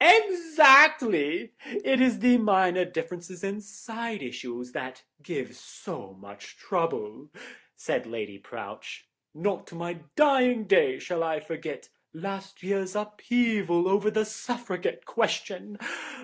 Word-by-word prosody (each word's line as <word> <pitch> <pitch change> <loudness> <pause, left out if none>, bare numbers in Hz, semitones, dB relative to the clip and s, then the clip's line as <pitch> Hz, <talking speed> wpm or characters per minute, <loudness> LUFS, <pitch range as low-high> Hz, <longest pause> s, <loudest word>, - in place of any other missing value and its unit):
"Exactly. 310 - +7
It 270 -3 0
is 250 -3 +3
the 245 0 +6
minor 190 -4 +2
differences 175 +1 -7
and 200 +2 -4
side 225 - -7
issues 125 0 -8
that 130 +1 -7 0.2
give - - -6
so 95 0 -10
much 100 0 -14
trouble," 150 - -3 0.5
said - - -3
Lady 105 -3 -7
Prowche; - - -10 0.3
"not 185 +4 -3
to - - -14
my 170 0 -6 0.2
dying 255 -6 +3
day 160 -9 +3
shall 175 -2 -4
I 160 -2 -1
forget 160 +1 -8 0.2
last 195 +3 -8
year's 190 0 -2
upheaval 210 -4 0
over 200 +2 +2
the 215 0 0
Suffragette 220 -3 -5
question. 210 -2 -3
195 Hz, 120 wpm, -26 LUFS, 165-235 Hz, 0.5 s, Exactly